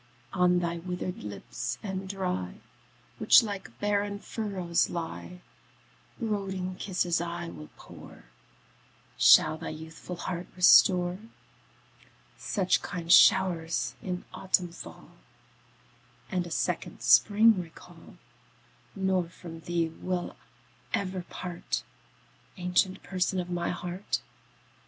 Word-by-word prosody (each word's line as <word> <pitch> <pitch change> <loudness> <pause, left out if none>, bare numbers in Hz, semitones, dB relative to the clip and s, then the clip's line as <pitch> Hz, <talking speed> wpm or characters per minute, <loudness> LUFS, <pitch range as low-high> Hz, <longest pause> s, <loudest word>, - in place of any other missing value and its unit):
On 180 -1 +3
thy 170 -1 -1
withered 180 - -5
lips 105 +3 -5
and 190 -2 -4
dry, 180 - -3 0.6
Which - - +7
like 200 -3 -7
barren 205 0 0
furrows 195 -6 -1
lie, 175 +1 -6 0.8
Brooding 195 -5 -2
kisses 180 -3 0
I 170 - -4
will 75 -3 -10
pour, - - -13 0.9
Shall 155 - +6
thy - - -5
youthful 160 +3 -8
heart 175 +1 -5
restore, 180 0 +5 1.2
Such 190 -4 0
kind 170 -3 -4
show'rs 165 -11 +5
in 180 -1 -4
autumn 185 -2 0
fall, - - -11 1.2
And 180 -2 -1
a - - -8
second - - -2
spring 215 -1 +5
recall; 165 -2 -14 0.8
Nor 190 -3 0
from 170 -2 -10
thee 170 0 -1
will 180 +2 -4 0.6
ever 185 -1 -3
part, 175 -1 -4 0.7
Ancient 180 +1 +1
Person 185 0 -1
of 180 0 -4
my 175 -1 -1
heart. 180 +3 -3
180 Hz, 105 wpm, -28 LUFS, 170-190 Hz, 1.2 s, Which